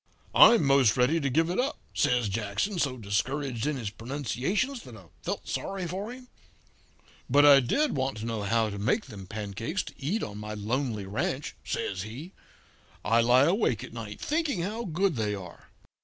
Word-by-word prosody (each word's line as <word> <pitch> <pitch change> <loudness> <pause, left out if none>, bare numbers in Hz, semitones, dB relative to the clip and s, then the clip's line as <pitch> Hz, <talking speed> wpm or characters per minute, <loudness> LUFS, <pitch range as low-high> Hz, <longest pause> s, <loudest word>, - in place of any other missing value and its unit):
"'I'm 230 -3 +8
most 135 -4 +4
ready 130 +7 +3
to 140 -3 0
give 160 +5 +2
it 180 - -1
up,' 275 +4 0 0.2
says 125 -3 +2
Jackson, 105 - -2
so 135 -5 0
discouraged 120 +5 -1
in 150 -2 -1
his 110 -5 -4
pronunciations 140 - -2
that 120 -3 -11
I 100 - -14 0.2
felt - - -4
sorry 195 -2 -3
for 195 +6 -4
him; 250 0 -11 1.0
'but 145 +3 +6
I 140 -1 +9
did 265 - +1
want 130 -3 -1
to 110 - -5
know 115 -2 -2
how 110 +1 +1
to 100 - -6
make 120 - +1
them 100 -7 -10
pancakes 110 - -3
to - - -10
eat 170 +11 -1
on 105 0 -6
my 105 0 -5
lonely 110 0 -2
ranch,' 140 - -3
says 95 -2 -3
he. 130 - -8 0.7
'I 115 +2 +4
lie 125 +3 +5
awake 170 - +1
at - - -9
nights 110 -3 -7
thinking 300 - 0
how 220 +5 -3
good 180 - 0
they 105 -2 0
are.' 95 -3 -11
130 Hz, 185 wpm, -28 LUFS, 110-175 Hz, 1.0 s, I